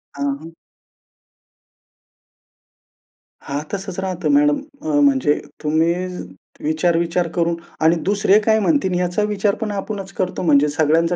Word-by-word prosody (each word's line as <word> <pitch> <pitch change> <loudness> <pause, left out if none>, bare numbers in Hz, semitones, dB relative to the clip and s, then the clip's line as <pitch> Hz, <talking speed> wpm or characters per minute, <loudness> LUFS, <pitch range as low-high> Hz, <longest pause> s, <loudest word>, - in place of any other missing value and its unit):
हां, 140 0 -1
हां. 165 +1 -10 3.0
हां, 140 +1 -2
तसंच 190 -1 -4
राहतं 180 -4 -2
मॅडम 145 0 +4 0.2
अ, 310 0 -3
म्हणजे 270 - +4 0.3
तुम्ही 160 +2 +2 0.7
विचार-विचार 170 +2 +1
करून 170 0 +1 0.3
आणि 160 +2 +5
दुसरे 205 +1 +4
काय 220 -1 +4
म्हणतील 195 - +1
याचा 180 +3 0
विचार 205 -1 0
पण 220 -3 -4
आपणच 195 -1 -5
करतो 185 -1 -2
म्हणजे 150 -3 +4
सगळ्यांचा 160 +3 +2
175 Hz, 120 wpm, -20 LUFS, 160-200 Hz, 3.0 s, आणि